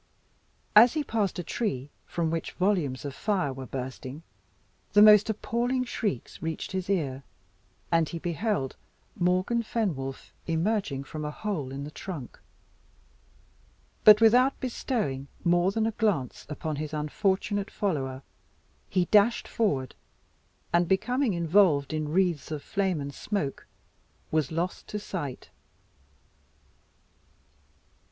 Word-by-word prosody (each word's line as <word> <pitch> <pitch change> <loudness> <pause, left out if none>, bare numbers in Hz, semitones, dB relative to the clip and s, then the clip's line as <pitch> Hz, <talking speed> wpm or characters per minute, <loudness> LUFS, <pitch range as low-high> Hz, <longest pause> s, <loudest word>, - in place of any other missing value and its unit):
As 230 +3 +9
he 305 - 0
passed 215 -8 -1
a 175 - -3
tree, 145 - -3 0.2
from 165 -2 -1
which 165 0 -3
volumes 175 -9 0
of 140 - -4
fire 185 -6 0
were 130 0 -8
bursting, 130 +3 -6 0.7
the 205 - +7
most 210 0 +8
appalling 240 +4 0
shrieks 210 - -3
reached 160 0 -4
his 185 0 -3
ear, 140 -9 0 0.7
and 165 -2 +3
he 170 - -4
beheld 175 - -2 0.4
Morgan 185 +4 +1
Fenwolf 165 - -3
emerging 165 -4 0
from 155 +2 -6
a 150 - -2
hole 150 -6 -3
in 140 +1 -5
the 150 - -7
trunk. 155 -7 -7 1.6
But 210 0 +9
without 250 +4 +5
bestowing 215 - -2 0.2
more 175 +2 +3
than 220 +2 0
a 225 - +1
glance 205 - -1
upon 155 0 -4
his 155 +1 -4
unfortunate 195 +6 0
follower, 135 -10 -2 0.7
he 185 -2 +2
dashed 210 +5 +4
forward, 145 - 0 0.8
and 170 0 +4
becoming 230 +4 +1
involved 165 -4 +3
in 155 -1 -1
the - - -5
wreaths 175 -2 +1
of 155 -2 -4
flame 190 -5 0
and 140 0 -5
smoke, 150 -4 -3 0.6
was 155 -2 +1
lost 170 +4 -3
to 210 - -4
sight. 170 -10 -6
175 Hz, 125 wpm, -28 LUFS, 145-210 Hz, 1.6 s, As